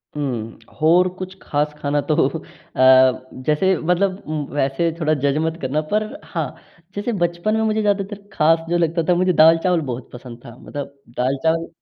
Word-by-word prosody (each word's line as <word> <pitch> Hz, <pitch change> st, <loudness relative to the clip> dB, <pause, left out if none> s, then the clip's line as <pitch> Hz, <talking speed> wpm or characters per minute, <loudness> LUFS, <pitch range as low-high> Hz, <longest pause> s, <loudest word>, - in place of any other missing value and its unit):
हुँ। 120 Hz, -6 st, -4 dB, 0.2 s
और 175 Hz, +3 st, +5 dB
कुछ 185 Hz, 0 st, -6 dB
ख़ास 150 Hz, +1 st, -1 dB
खाना 145 Hz, 0 st, 0 dB
तो 150 Hz, -, +3 dB, 0.2 s
अ, -, -, -10 dB, 1.0 s
जैसे 185 Hz, +5 st, +2 dB
मतलब 185 Hz, +4 st, 0 dB
उम, 155 Hz, -1 st, -3 dB
वैसे 145 Hz, +4 st, 0 dB
थोड़ा 155 Hz, -2 st, +1 dB
जज 140 Hz, +1 st, +2 dB
मत 160 Hz, 0 st, -2 dB
करना 140 Hz, +4 st, -1 dB
पर 215 Hz, +1 st, +2 dB, 0.2 s
हाँ, -, -, -4 dB, 0.4 s
जैसे 205 Hz, +4 st, -2 dB
बचपन 170 Hz, +5 st, 0 dB
में 220 Hz, -, +1 dB
मुझे 220 Hz, 0 st, +1 dB
ज़्यादातर 200 Hz, 0 st, -2 dB
ख़ास 165 Hz, +1 st, +3 dB
जो 175 Hz, -, +2 dB
लगता 165 Hz, 0 st, +1 dB
था, 175 Hz, -, +5 dB
मुझे 185 Hz, +1 st, +2 dB
दाल-चावल 165 Hz, +2 st, +4 dB
बहुत 120 Hz, +1 st, -7 dB
पसंद 120 Hz, -1 st, -10 dB
था। 115 Hz, -, -11 dB
मतलब 140 Hz, -1 st, -8 dB, 0.2 s
दाल-चावल 160 Hz, +6 st, 0 dB
165 Hz, 170 wpm, -20 LUFS, 145-185 Hz, 1.0 s, और